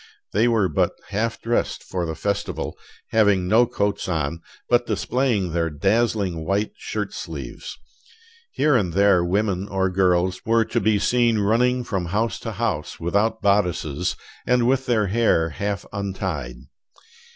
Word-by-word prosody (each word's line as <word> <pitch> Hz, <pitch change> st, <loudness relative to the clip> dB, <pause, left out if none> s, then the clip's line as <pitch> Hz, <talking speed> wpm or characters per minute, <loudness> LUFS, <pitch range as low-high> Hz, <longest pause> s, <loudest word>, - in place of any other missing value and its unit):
They 110 Hz, +4 st, +3 dB
were 110 Hz, -5 st, +3 dB
but 75 Hz, -, +1 dB, 0.2 s
half 115 Hz, +3 st, -1 dB
dressed 120 Hz, +1 st, -1 dB
for 90 Hz, -2 st, -3 dB
the 80 Hz, -, -4 dB
festival, 100 Hz, +2 st, -3 dB, 0.3 s
having 100 Hz, -5 st, +3 dB
no 115 Hz, +5 st, +4 dB
coats 100 Hz, -3 st, -1 dB
on, 80 Hz, -1 st, -2 dB, 0.3 s
but 120 Hz, 0 st, +2 dB
displaying 120 Hz, -9 st, 0 dB
their 85 Hz, 0 st, 0 dB
dazzling 95 Hz, +1 st, 0 dB
white 100 Hz, +5 st, 0 dB
shirt 105 Hz, -2 st, -4 dB
sleeves. 75 Hz, -9 st, -7 dB, 0.7 s
Here 150 Hz, -2 st, +2 dB
and 95 Hz, -8 st, +1 dB
there 100 Hz, -2 st, +4 dB
women 95 Hz, +1 st, 0 dB
or 95 Hz, -2 st, 0 dB
girls 90 Hz, 0 st, +2 dB
were 115 Hz, 0 st, +3 dB
to -, -, -1 dB
be 105 Hz, +1 st, +2 dB
seen 120 Hz, +1 st, +2 dB
running 120 Hz, +5 st, +2 dB
from 95 Hz, -6 st, -2 dB
house 105 Hz, +7 st, -1 dB
to 115 Hz, -, -5 dB
house 100 Hz, -8 st, -2 dB
without 105 Hz, +6 st, 0 dB
bodices, 90 Hz, -5 st, +1 dB, 0.3 s
and 125 Hz, -1 st, +3 dB
with 130 Hz, +1 st, +1 dB
their 110 Hz, -4 st, +2 dB
hair 100 Hz, -5 st, +2 dB
half 100 Hz, +5 st, -3 dB
untied. 95 Hz, -10 st, -3 dB
100 Hz, 145 wpm, -23 LUFS, 90-115 Hz, 0.7 s, no